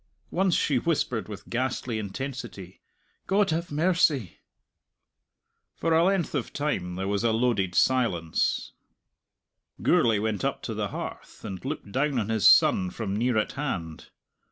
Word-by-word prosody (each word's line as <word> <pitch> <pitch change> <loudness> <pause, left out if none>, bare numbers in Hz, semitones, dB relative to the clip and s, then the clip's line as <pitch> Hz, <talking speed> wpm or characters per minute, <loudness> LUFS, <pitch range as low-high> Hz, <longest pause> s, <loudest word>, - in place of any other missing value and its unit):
Once 185 -1 +2
she 135 -4 +2
whispered 125 -8 -1
with 105 -1 -9
ghastly 125 -2 -2
intensity, 110 -3 -6 0.5
"God 195 -2 +2
have 170 +2 -2
mercy!" 155 - +1 1.4
For 165 - 0
a 165 +1 +5
length 190 -2 +1
of 140 -6 -2
time 95 -12 -2
there 95 +1 -3
was 100 +2 0
a 115 - +3
loaded 110 -6 +1
silence. 95 -12 +1 1.1
Gourlay 115 -3 +4
went 105 -2 -2
up - - -2
to - - -3
the - - -2
hearth, - - -8
and 95 -1 -6
looked 135 -7 -5
down 140 +3 0
on 110 -2 -1
his 110 -3 +5
son 90 -1 +5
from 100 +1 -4
near 120 +1 +1
at 110 - 0
hand. 90 - -5
120 Hz, 145 wpm, -27 LUFS, 100-150 Hz, 1.4 s, a